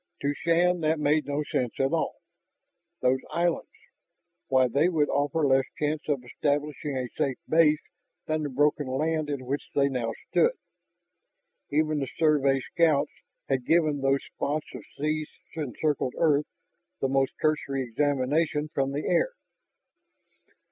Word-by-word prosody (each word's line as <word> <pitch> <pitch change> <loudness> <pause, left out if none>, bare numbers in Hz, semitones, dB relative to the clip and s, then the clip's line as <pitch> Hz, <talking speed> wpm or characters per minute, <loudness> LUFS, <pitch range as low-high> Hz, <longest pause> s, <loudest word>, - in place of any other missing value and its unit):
To 140 +1 +1
Shann 175 +3 +2
that 160 0 +1
made 150 0 +2
no 145 +1 -1
sense 125 -4 -1
at 135 +3 +1
all. 165 - 0 0.9
Those 130 +1 +3
islands... 170 0 0 0.8
why, 130 -1 +4
they 145 +8 +2
would 155 -4 +1
offer 145 +2 +1
less 135 -1 +4
chance 150 0 -1
of 140 -4 0
establishing 145 +2 -2
a 130 -1 -2
safe 135 -2 0
base 155 -2 +4 0.4
than 155 0 -1
the 145 - -2
broken 145 +1 +1
land 155 +3 -1
in 140 -3 -3
which 140 +3 -1
they 140 0 +3
now 120 -4 -2 0.2
stood. 480 +1 +4 1.2
Even 155 0 +1
the 135 - -2
survey 140 -4 +3
scouts 155 0 +2 0.4
had 135 -2 0
given 155 -4 +3
those 135 0 +2
spots 150 +2 -2
of - - -7 0.2
sea 155 +1 -1 0.3
encircled 150 -2 -1
earth 150 -2 +3 0.5
the 135 - +1
most 135 0 +1
cursory 150 -3 0
examination 145 +4 0
from 135 0 0
the 145 - -3
air. - - +2
145 Hz, 140 wpm, -27 LUFS, 135-155 Hz, 1.2 s, why